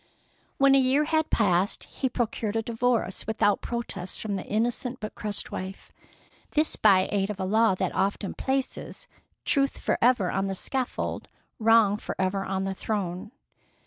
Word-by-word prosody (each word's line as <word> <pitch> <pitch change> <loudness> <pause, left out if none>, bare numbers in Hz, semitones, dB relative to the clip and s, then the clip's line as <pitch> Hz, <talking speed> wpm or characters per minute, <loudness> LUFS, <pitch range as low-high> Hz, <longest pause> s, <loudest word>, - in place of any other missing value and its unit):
When 275 0 +5
a 275 - +6
year 265 +3 +3
had 315 0 +1
passed 195 -2 +2
he 260 - -3
procured 225 -3 -2
a 225 - 0
divorce 230 -4 -1
without 205 -2 +2
protest 205 -6 -3
from 210 -2 -3
the 190 - -3
innocent 240 +4 -1
but 215 0 -6
crushed 210 -1 -3
wife, 190 +1 -7 0.6
this 305 +1 +1
by 195 -3 +5
aid 200 -1 0
of 205 -2 -5
a 190 - -1
law 220 +1 +3
that - - -2
often 195 +1 -1
places 270 - -3 0.4
"Truth 275 -1 +1
forever 230 -7 +2
on 195 0 0
the 195 - -2
scaffold, 255 +6 -3 0.3
Wrong 225 -2 +5
forever 195 -1 -2
on 190 0 -2
the 195 0 -2
throne." 190 -1 -3
215 Hz, 155 wpm, -27 LUFS, 195-245 Hz, 0.6 s, a